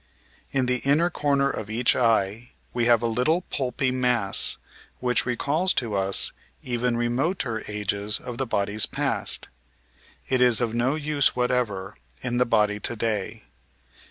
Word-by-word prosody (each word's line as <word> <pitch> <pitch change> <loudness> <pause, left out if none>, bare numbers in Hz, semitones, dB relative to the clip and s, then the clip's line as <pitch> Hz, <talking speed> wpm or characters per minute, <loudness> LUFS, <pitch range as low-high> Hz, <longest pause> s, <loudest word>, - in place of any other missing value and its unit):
In 135 -2 0
the 125 0 +1
inner 150 +7 +1
comer 140 -3 +1
of 110 -1 -6
each 120 +2 +2
eye 115 -1 0 0.2
we 120 -1 0
have 120 -1 +3
a - - +1
little 125 +10 +1
pulpy 130 -1 -1
mass 125 -6 +2 0.4
which 125 0 0
recalls 145 +9 0
to 115 -4 -1
us 95 0 +3 0.3
even 120 -1 -1
remoter 120 - -1
ages 105 0 -2
of 120 0 -8
the 135 - -1
body's 100 0 +1
past. - - 0 0.8
It 130 -1 +1
is 125 -3 +6
of 120 -3 -1
no 120 +4 0
use 150 -2 0
whatever 120 -6 -1 0.3
in 120 -1 -2
the 125 - +2
body 105 -2 +1
to 120 - +1
day. 110 0 -3
120 Hz, 150 wpm, -24 LUFS, 110-130 Hz, 0.8 s, is